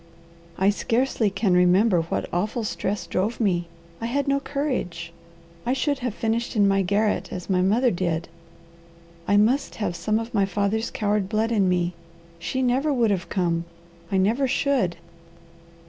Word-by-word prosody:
I 195 +2 +4
scarcely 230 +1 0
can 195 -1 +1
remember 180 +1 +4
what 165 - -3
awful 210 +6 -1
stress 210 -1 -2
drove 205 +6 -1
me. 175 -6 +1 0.3
I 230 - -1
had 280 +4 -1
no 275 0 +2
courage. 250 - -3 0.5
I 250 - 0
should 285 +1 0
have 245 -4 -3
finished 230 +2 -1
in 205 -2 +4
my 195 0 +3
garret 205 +3 0
as 180 +2 -5
my 180 -1 +3
mother 230 +7 +3
did. 170 -2 -1 1.0
I 205 - +4
must 240 +7 +2
have 205 -5 -2
some 215 +4 0
of 230 +2 -5
my 200 -3 +3
father's 200 +4 -1
coward 205 -2 -1
blood 220 +2 0
in 200 -5 +3
me. 180 -1 +1 0.5
She 260 +10 -2
never 260 +5 +2
would 235 -6 +2
have 185 -2 -2
come. 170 -3 0 0.5
I 195 - +2
never 225 +8 +2
should!" 255 -9 +1
210 Hz, 160 wpm, -24 LUFS, 185-240 Hz, 1.0 s, I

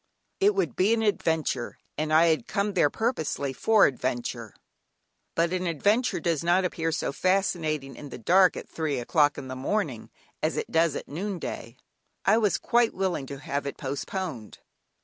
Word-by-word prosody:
It 410 +1 +4
would 390 - 0
be 205 +5 +3
an 225 - -1
adventure, 160 - 0 0.2
and 155 +1 -2
I 165 +2 +6
had 155 -7 0
come 200 +1 -1
there 170 -6 +3
purposely 160 - -2
for 215 - +4
adventure, 120 -4 -3 0.8
but 170 +1 +1
an 185 0 -1
adventure 205 - +1
does 165 -4 -1
not 175 +2 +3
appear 165 -2 -1
so 160 - -1
fascinating 155 -5 0
in 145 - -9
the - - -7
dark 185 +9 +4
at - - -7
three 155 -4 -2
o'clock 145 +4 +2
in 130 - -6
the 130 - -5
morning, 135 - -2 0.3
as - - 0
it - - -3
does 165 -2 +3
at - - -5
noonday. 165 - -5 0.5
I 215 +3 +5
was 210 -3 +2
quite 240 -1 +2
willing 180 -8 -1
to 140 - -6
have 140 0 -3
it - - -5
postponed. 140 - -5
165 Hz, 170 wpm, -27 LUFS, 140-195 Hz, 0.8 s, I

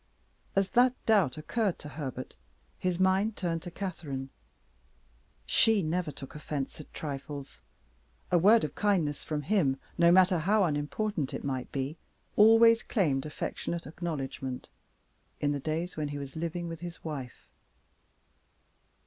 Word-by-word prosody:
As 195 -1 +2
that 250 +1 +5
doubt 195 - +3
occurred 200 +5 -1
to 150 - -9
Herbert 135 -4 -6 0.4
his 180 -1 -1
mind 190 +3 +2
turned 165 -3 -1
to 175 - -7
Catherine. 155 -8 -5 1.1
She 220 -4 +4
never 160 0 -1
took 135 -1 -10
offense 150 -1 -4
at - - -15
trifles; 140 - -6 0.7
a 175 - +5
word 215 +6 +6
of 150 -2 -2
kindness 175 -9 +1
from 150 -1 -3
him, 145 -7 +2 0.2
no 170 0 +7
matter 185 -1 +5
how 200 +6 +3
unimportant 150 +1 -1
it - - -5
might 130 -2 -3
be, 140 +4 -3 0.4
always 225 +2 +7
claimed 150 - 0
affectionate 170 +2 -4
acknowledgment 140 -5 -5 0.7
in 145 - +1
the 145 - -1
days 160 +5 -3
when 150 -1 -2
he 145 0 -4
was 140 -1 -7
living 170 +2 -3
with 165 -1 -6
his 175 0 -8
wife. 140 -6 -6
165 Hz, 140 wpm, -30 LUFS, 145-190 Hz, 1.1 s, no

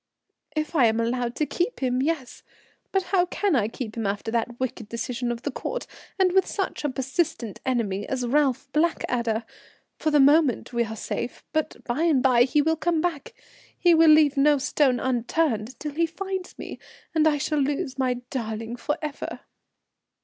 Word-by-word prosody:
"If 310 +1 -2
I 265 -6 +5
am 225 +1 +1
allowed 240 +1 -1
to 305 - 0
keep 355 +10 -2
him, 255 -1 0
yes. 285 -3 -2 0.5
But 385 -1 +1
how 360 -2 +4
can 395 -2 0
I 215 -5 +2
keep 225 -1 -6
him 225 -3 -2
after 205 +2 -2
that 235 +1 -2
wicked 250 -4 -4
decision 240 +1 -3
of 235 0 -5
the 285 - -2
Court, - - -4 0.3
and 375 -2 +3
with 380 +1 +3
such 390 -6 -3
a 295 - +1
persistent 265 - -2
enemy 210 -6 -1
as 255 -2 -1
Ralph 275 +1 +1
Blackadder? 240 -8 0 0.6
For 315 - +1
the 295 -1 +4
moment 280 -3 +4
we 235 0 +1
are 220 0 -6
safe, 235 +2 -4
but 310 -1 -2
by 240 +5 -2
and 310 -7 +3
by 245 -2 +5
he 290 +3 +2
will 320 +1 +1
come 330 +1 +1
back, 350 - -3 0.4
he 350 -1 +5
will 325 0 +6
leave 305 -2 +6
no 290 +1 +5
stone 265 -2 +2
unturned 245 -2 0
until 290 +3 -7
he 335 +2 +1
finds 380 +2 -5
me, - - -8 0.3
and 315 -1 +4
I 300 -1 +3
shall 300 +1 -1
lose 275 0 -1
my 255 -1 +1 0.2
darling 225 -1 -4
for 295 +5 -2
ever." 300 -2 -5
270 Hz, 185 wpm, -25 LUFS, 240-315 Hz, 0.6 s, will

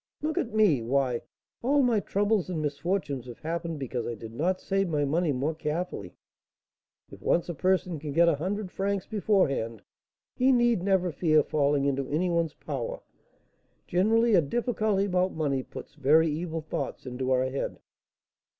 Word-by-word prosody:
Look 310 0 0
at 230 - -2
me: 210 - +4
why, 125 0 0 0.4
all 280 +3 +3
my 235 -4 +3
troubles 205 -1 0
and 175 -3 -2
misfortunes 145 -3 -2
have 120 - -9
happened 165 0 -3
because 125 -3 -3
I 120 - -3
did 115 +1 -9
not 180 +9 0
save 195 -1 0
my 150 -2 +1
money 160 +3 +1
more 140 +4 -1
carefully. 155 - -4 1.0
If - - -12
once 170 - +1
a - - -1
person 180 0 0
can 150 0 -5
get 170 +4 +4
a 170 - +5
hundred 190 +4 -3
francs 195 -1 -1
beforehand, 155 - 0 0.5
he 260 +1 +4
need 240 -5 +3
never 185 -2 +2
fear 155 -1 +3
falling 145 -1 +1
into 140 -1 -1
any 175 +5 0
one's 165 -3 0
power; - - -5 0.8
generally, 225 +5 +3
a 180 - +6
difficulty 215 - 0
about 185 -1 +1
money 140 -4 0
puts - - -10
very 155 +2 +4
evil 165 +1 -3
thoughts 155 - -5
into 130 0 -3
our 130 0 +3
head." 135 - -3
170 Hz, 165 wpm, -28 LUFS, 140-195 Hz, 1.0 s, a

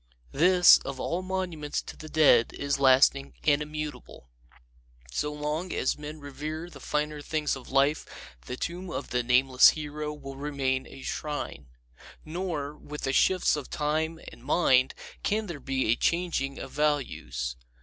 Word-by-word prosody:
This, 180 +4 +7
of 135 -1 -6
all 170 +6 -1
monuments 185 -5 -3
to - - -9
the 155 - -10
dead, 140 -8 +5
is 140 0 -2
lasting 135 +1 +4
and 145 -1 +3
immutable. 150 - -7 0.8
So 150 - -1
long 150 +4 -3
as - - 0
men 150 +1 -8
revere 155 +4 -6
the - - -12
finer 150 0 -2
things 150 0 -1
of 135 - -11
life 140 +3 +2 0.4
the 125 - -4
tomb 175 +5 -4
of - - -5
the 125 - +1
nameless 125 +1 +6
hero 150 0 -4
will 135 -2 -9
remain 135 -2 -1
a 135 - -11
shrine. 145 - -4 0.6
Nor, 155 -4 -3
with 150 0 -9
the 135 - 0
shifts 185 +4 +3
of 145 -3 -6
time 160 +1 -1
and 120 - -15
mind, 130 -3 +3 0.3
can 215 +1 0
there 170 -7 -6
be 130 -5 0
a - - +4
changing 165 -4 0
of 135 - -7
values. 130 - -1
150 Hz, 155 wpm, -28 LUFS, 135-155 Hz, 0.8 s, This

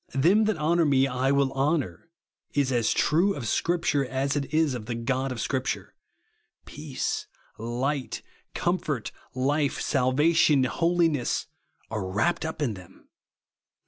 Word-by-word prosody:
Them 185 +11 +4
that 215 -4 +1
honour 165 +3 +2
me 135 -2 +4
I 130 0 0
will 140 -1 +2
honour, 135 - -1 0.5
is 140 -2 +2
as 120 -3 +2
true 180 +7 +2
of 125 -5 -5
Scripture 155 -3 +1
as 135 +2 -1
it 140 -1 -2
is 155 -3 +2
of 115 -4 -6
the 120 - -2
God 130 +3 -1
of 125 - -5
Scripture. 130 +4 -2 0.7
Peace, 150 -4 -4 0.3
Kght, 130 +4 -2 0.3
comfort, 155 - -1 0.2
life, 140 +2 +1
salvation, 145 +2 +3
holi 170 +5 +2
ness, 140 -6 -1 0.5
are 110 -3 -2
wrapt 110 - 0
up 160 -1 -3
in 120 -6 0
them. 95 -3 -14
140 Hz, 140 wpm, -26 LUFS, 130-155 Hz, 0.7 s, Them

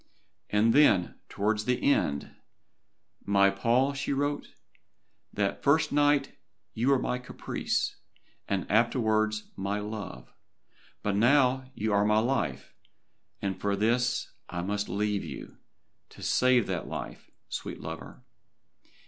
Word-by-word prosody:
And 110 +2 +3
then, 110 -12 +4
towards 105 +1 0
the 125 -1 +1
end, 70 - -1 0.9
"My 100 -1 +4
Paul," 120 +7 +2
she 140 0 -3
wrote, 145 +1 -1 0.8
"that 100 -1 -1
first 145 +3 +3
night 145 0 +2 0.4
you 120 +4 0
were 140 - +5
my 125 0 -2
caprice, 125 - -3 0.5
and 100 -2 -1
afterwards 110 -1 +1
my 100 +2 -2
love, 105 - -7 0.7
but 100 -1 0
now 130 +3 +3
you 110 0 -1
are 100 0 +4
my 105 +1 +3
life, 110 - -1 0.7
and 95 -2 -2
for 100 0 +1
this 120 +4 +1 0.2
I 85 -1 -3
must 100 +2 -2
leave 105 0 -1
you, - - -8 0.5
to - - -13
save 125 -3 +3
that 90 -3 -3
life, - - -7 0.2
sweet - - -5
lover. - - -8
110 Hz, 125 wpm, -28 LUFS, 100-125 Hz, 0.9 s, were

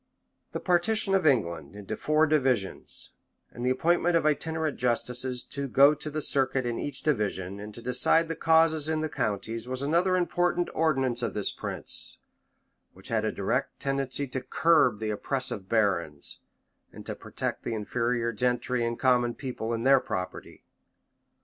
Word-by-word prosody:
The - - -3
partition 195 +3 +1
of 190 -4 +3
England 100 - 0
into 105 +1 -5
four 155 +5 +2
divisions, 130 -10 0 0.4
and 120 - -7
the 125 - +2
appointment 170 +6 +2
of 165 - +2
itinerant 160 0 0
justices 125 +1 0
to 140 -1 -3
go 140 +3 +6
the 150 0 -3
circuit 135 -2 +2
in 120 -1 -2
each 145 -3 -5
division, 100 -8 -1
and 105 +1 -7
to 120 - -9
decide 125 +7 +3
the 165 - -3
causes 160 -2 +3
in 155 -1 0
the 155 - -2
counties, 115 -2 -3
was 130 +1 -3
another 170 +6 +2
important 175 0 0
ordinance 135 -6 +1
of 115 - -3
this 105 - 0
prince, - - -4 0.8
which - - -12
had - - 0
a - - 0
direct - - -2
tendency 135 0 -1
to 130 +1 -3
curb 140 -2 +3
the 110 0 -2
oppressive 110 -3 -2
barons, 95 -10 0 0.5
and - - -11
to - - -3
protect - - -5
the 115 - -3
inferior 115 +2 -1
gentry 125 +1 0
and 115 0 -2
common 125 -2 +2
people 125 -4 -5
in 115 0 -2
their 135 +1 +6
property. 90 -6 -6
130 Hz, 160 wpm, -28 LUFS, 115-155 Hz, 0.8 s, go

